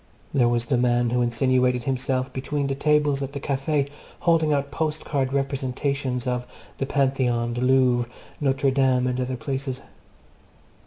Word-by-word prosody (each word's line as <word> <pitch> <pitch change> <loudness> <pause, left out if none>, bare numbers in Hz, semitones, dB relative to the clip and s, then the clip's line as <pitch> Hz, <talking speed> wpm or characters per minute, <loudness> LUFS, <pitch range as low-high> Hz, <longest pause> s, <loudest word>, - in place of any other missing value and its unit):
There 125 -4 +4
was 120 0 0
the 125 -2 +1
man 120 -1 +2
who 125 0 +2
insinuated 125 +1 +2
himself 130 0 -1
between 140 +2 -2
the 140 - -1
tables 145 0 +2
at 135 0 -4
the 140 - -4
Café, 140 +1 0 0.3
holding 165 -2 +3
out 140 -1 0
postcard 150 -4 -1
representations 135 -1 -1
of 125 -1 -2 0.3
the 135 - -1
Pantheon, 130 -4 +1
the 120 - -3
Louvre, 125 -2 +3 0.3
Notre 135 -1 +2
Dame, 130 -2 +2
and 125 0 -1
other 125 0 -2
places. 135 +1 -4
130 Hz, 150 wpm, -24 LUFS, 125-140 Hz, 0.3 s, There